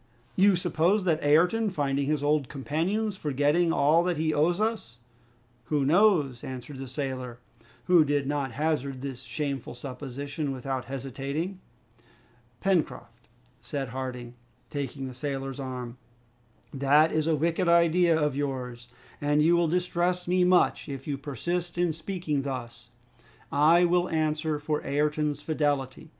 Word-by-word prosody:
you 195 0 +5
suppose 175 +3 +1
that 165 -3 +1
Ayrton 180 +10 +3
finding 140 -5 -1
his 150 -1 0
old 145 -3 +1
companions, 180 +10 -1
forgetting 150 +2 +1
all 165 +1 +4
that 180 -3 0
he 155 0 0
owes 170 +5 +2
us 215 - -2 0.3
" 120 0 -36
"Who 145 +2 0
knows?" 155 - +3
answered 130 +1 -7
the 135 - -6
sailor, 130 -2 -4 0.5
who 175 -3 +5
did 145 -1 0
not 140 -3 -2
hazard 140 -2 -1
this 135 -3 -5
shameful 140 -1 -4
supposition 140 +3 -5
without 130 0 -4
hesitating. 140 +7 -4 1.0
"Pencroft," 150 -11 -1 0.3
said 140 -3 -4
Harding, 125 -1 -5 0.4
taking 140 -1 -4
the 130 - -7
sailor's 135 0 -4
arm, 125 -2 -6 0.8
"that 145 +3 +4
is 155 0 0
a 160 - +3
wicked 165 +3 0
idea 170 0 +4
of 150 -3 0
yours, 125 -4 -4 0.3
and 145 +1 +2
you 170 +2 +5
will 170 -1 +3
distress 180 +1 0
me 180 +1 +3
much 180 -3 +3
if 135 -1 -6
you 145 - -1
persist 170 +6 -4
in 175 -2 +1
speaking 160 -3 -3
thus. 120 -3 -6 0.6
I 160 +5 +5
will 175 +1 +2
answer 155 -1 0
for 150 +1 -2
Ayrton's 150 +1 0
fidelity." 145 -2 -1
145 Hz, 140 wpm, -27 LUFS, 135-170 Hz, 1.0 s, you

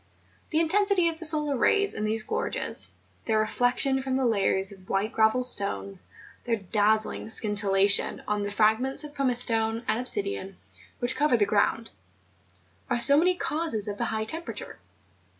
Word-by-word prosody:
The 315 - 0
intensity 375 +1 +2
of 325 -1 -7
the 335 - +4
solar 300 -2 +3
rays 405 - +1
in 215 - -4
these 215 +1 0
gorges, - - 0 0.4
their 220 -1 0
reflection 245 +4 0
from 265 0 -3
the 265 -1 0
layers 195 -3 +1
of 190 -1 -16
white 195 +3 -1
gravel 220 +3 +2
stone, 100 - -1 0.4
their 235 - -1
dazzling 215 +2 0
scintillation 205 -2 +2
on 210 0 -1
the 205 - -3
fragments 220 +7 0
of 295 -1 -10
pumice 260 -4 +2
stone 225 0 0
and 220 +2 0
obsidian, 255 - -4 0.4
which 245 +1 -1
cover 295 -4 +2
the 205 - +2
groimd, 215 +2 0 1.0
are - - 0
so 280 +4 +6
many 360 +5 +3
causes 305 - -1
of 205 0 -6
the 235 - 0
high 220 -1 -2
temperature. 325 +9 -7
230 Hz, 160 wpm, -26 LUFS, 210-290 Hz, 1.0 s, so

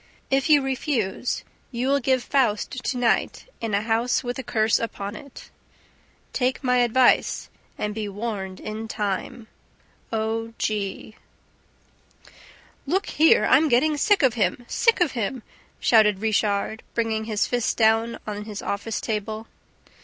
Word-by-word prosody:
If 270 +3 +2
you 290 -2 +6
refuse, 255 -5 -2 0.3
you 245 +1 -2
will 280 +1 +3
give 260 -1 +1
FAUST 240 -7 +1
to 255 - -1
night 245 -1 0 0.2
in 225 -3 -1
a 205 - 0
house 230 +3 +1
with 245 +1 -4
a - - -4
curse 220 -2 +2
upon 205 -2 -5
it. 280 +3 -12 0.8
Take 255 +2 0
my 250 -1 +2
advice 245 +1 +3 0.3
and 210 0 -2
be 210 -1 -4
warned 200 -3 -5
in 220 +1 -6
time. 210 +2 -3 0.7
O. 225 +1 -2
G. 210 0 -3 1.7
"Look 380 +7 +1
here, 320 +2 +4
I'm 295 +4 +4
getting 295 +5 +3
sick 395 +4 +3
of 260 -4 +4
him, 220 +2 -1
sick 460 -5 +2
of 335 -6 +3
him!" 235 0 -3 0.4
shouted 215 -3 +4
Richard, 215 +1 0
bringing 220 -2 -1
his 215 -2 0
fists 245 -2 0
down 225 +1 +2
on 210 -1 -5
his 210 -2 -7
office 210 +2 -3
table. 215 0 -3
225 Hz, 140 wpm, -24 LUFS, 215-255 Hz, 1.7 s, you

